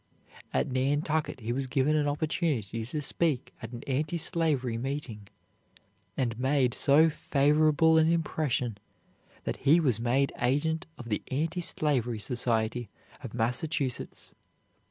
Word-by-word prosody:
At - - 0
Nantucket 145 +2 0
he 115 +2 -2
was 135 +1 -2
given 140 +3 +2
an 150 -1 +2
opportunity 145 - -1
to 150 +4 -3
speak 150 -2 0
at - - -7
an 120 -1 -8
anti 150 +5 -1
slavery 155 -8 0
meeting, 120 -4 -5 0.9
and 120 -3 -1
made 130 -2 +2
so 150 +4 +5
favorable 155 +2 +3
an 160 +1 +4
impression 140 -9 -1 0.6
that - - -3
he 155 +5 +4
was 130 -9 +2
made 125 +4 +1
agent 155 +6 0
of 120 -2 -9
the 105 - -1
Anti 160 +6 -1
Slavery 130 -9 0
Society 115 0 -1 0.3
of 115 -3 -7
Massachusetts. 125 +3 -2
135 Hz, 130 wpm, -29 LUFS, 120-155 Hz, 0.9 s, so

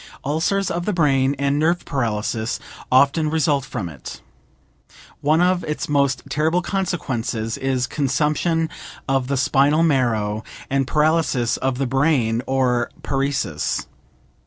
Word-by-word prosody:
Ulcers 165 +7 0
of 175 +1 -2
the 210 - +1
brain 140 -5 +2
and 140 +1 +1
nerve 170 +3 +1
paralysis 115 -3 -2 0.3
often 140 +4 +4
result 150 -3 +1
from 105 -8 -4
it. 70 -6 -9 1.0
One 155 +3 +2
of 180 0 +2
its 150 -2 -3
most 140 -2 +1
terrible 155 +5 +1
consequences 130 - -2
is 130 -1 -1
consumption 150 +5 0 0.4
of 135 -2 +1
the 140 0 0
spinal 140 +5 +3
marrow 110 -8 +1 0.3
and 135 -1 +1
paralysis 150 -5 +2
of 130 -1 -1
the 135 - 0
brain, 130 -4 +1
or 125 -3 +1
paresis. 135 - -1
140 Hz, 125 wpm, -21 LUFS, 125-155 Hz, 1.0 s, often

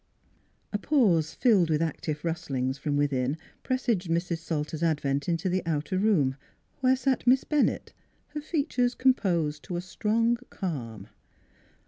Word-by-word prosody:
A 205 - 0
pause, 200 - +2
filled 205 -9 +4
with 155 -1 +2
active 155 -1 -3
rustlings 135 -6 -2
from 145 0 -1
within 140 0 0 0.2
presaged 235 -9 -1
Mrs. 170 0 0
Salter's 160 -1 -3
advent 145 -3 0
into 165 +1 0
the 185 +1 +1
outer 165 +3 -1
room, 155 -11 +2 0.4
where 260 0 +4
sat 260 -1 0
Miss 260 +2 +5
Bennett, 300 -2 0 0.4
her 300 0 -5
features 280 -6 0
composed 175 - +1
to 180 - -6
a 175 - -1
strong 230 +5 +1
calm. 115 - -5
170 Hz, 135 wpm, -28 LUFS, 150-235 Hz, 0.4 s, Miss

